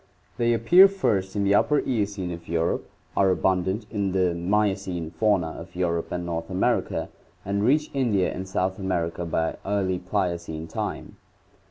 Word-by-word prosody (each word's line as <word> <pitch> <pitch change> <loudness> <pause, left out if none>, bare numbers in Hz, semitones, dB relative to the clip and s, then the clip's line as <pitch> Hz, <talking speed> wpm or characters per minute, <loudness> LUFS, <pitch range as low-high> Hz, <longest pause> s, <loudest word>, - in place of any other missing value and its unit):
They 120 0 +2
appear 175 - +7
first 105 - -1
in 100 - +1
the 100 0 +3
Upper 145 +8 +3
Eocene 100 -7 -2
of 85 -1 -8
Europe, 85 0 -1 0.3
are 95 -1 +4
abundant 95 +3 +1
in 100 -3 -1
the 90 -2 +2
Miocene 95 -2 -1
fauna 90 -1 +1
of 85 +2 -10
Europe 85 -2 -1
and 90 -1 -3
North 85 -1 -4
America, 95 -1 0 0.4
and 100 +1 -1
reach 150 +6 +2
India 115 -9 +1
and 95 +1 -6
South 95 0 -1
America 85 -3 -2
by 80 0 -1
early 95 -2 0
Pliocene 85 -4 -2
time. 80 - -5
95 Hz, 155 wpm, -25 LUFS, 85-105 Hz, 0.4 s, appear